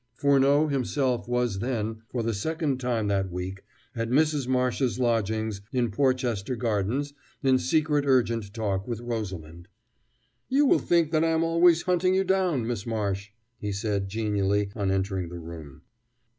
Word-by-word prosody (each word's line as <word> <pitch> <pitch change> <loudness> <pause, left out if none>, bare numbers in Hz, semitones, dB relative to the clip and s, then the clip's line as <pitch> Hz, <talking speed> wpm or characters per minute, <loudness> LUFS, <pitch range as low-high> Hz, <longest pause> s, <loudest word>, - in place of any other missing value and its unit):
Furneaux 140 +2 +4
himself 130 -3 0
was 120 -5 0
then, 110 -2 -2
for 120 -2 -2
the 115 0 0
second 150 - -1
time 120 -4 -1
that 95 -2 0
week, 90 +2 -5 0.3
at 115 -1 -2
Mrs. 150 0 +2
Marsh's 125 -2 +1
lodgings 110 -3 0
in 125 -4 0
Porchester 125 -2 0
Gardens 120 +5 -1 0.3
in 130 -1 +4
secret 150 +3 +1
and - - -5
urgent 115 -5 +2
talk 100 -3 -2
with 120 -3 -3
Rosalind. 95 -8 -5 0.8
"You 280 +3 +4
will - - +4
think 170 -3 +2
that 155 -1 +2
I 165 - +2
am 160 0 +2
always 170 +1 +4
hunting 185 0 +2
you 190 - +3
down, 185 -10 +1
Miss 115 -2 -3
Marsh," 105 -3 -2 0.3
he 105 - -3
said 100 -1 -2
genially 100 -1 0
on 100 -3 -1
entering 95 -2 -1
the 85 - -7
room. 80 -3 -10
115 Hz, 155 wpm, -26 LUFS, 100-140 Hz, 0.8 s, Furneaux